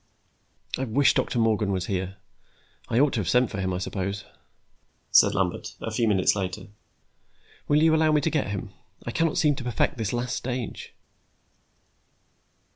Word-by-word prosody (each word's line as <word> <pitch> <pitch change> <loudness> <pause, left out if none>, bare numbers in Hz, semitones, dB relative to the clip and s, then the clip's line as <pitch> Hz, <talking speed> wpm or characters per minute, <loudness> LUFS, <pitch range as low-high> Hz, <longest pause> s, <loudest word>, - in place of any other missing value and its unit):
"I 135 - -1
wish 130 +4 +3
Doctor - - -1
Morgan 110 -3 +2
were 95 - 0
here; 95 +1 -3 0.7
I 115 - 0
ought 145 0 +3
to - - 0
have 90 -5 -2
sent 125 0 +3
for 100 - -3
him, 95 0 -1
I 90 - -1
suppose," 95 +1 -4 0.9
said - - +6
Lambert, - - -2
a 115 - -4
few 115 +1 +1
minutes 95 -3 +3
later. 95 0 -4 1.0
"Will 150 +1 +3
you 160 -1 +5
allow 160 0 +3
me 150 -1 +3
to 160 - 0
get 150 -4 0
him? 100 0 -5 0.3
I 120 - -3
cannot 165 +5 0
seem 155 -4 +4
to - - -5
perfect 120 0 0
this 110 -3 -1
last 120 +1 -2
stage." 125 -2 -5
115 Hz, 170 wpm, -26 LUFS, 100-135 Hz, 1.0 s, said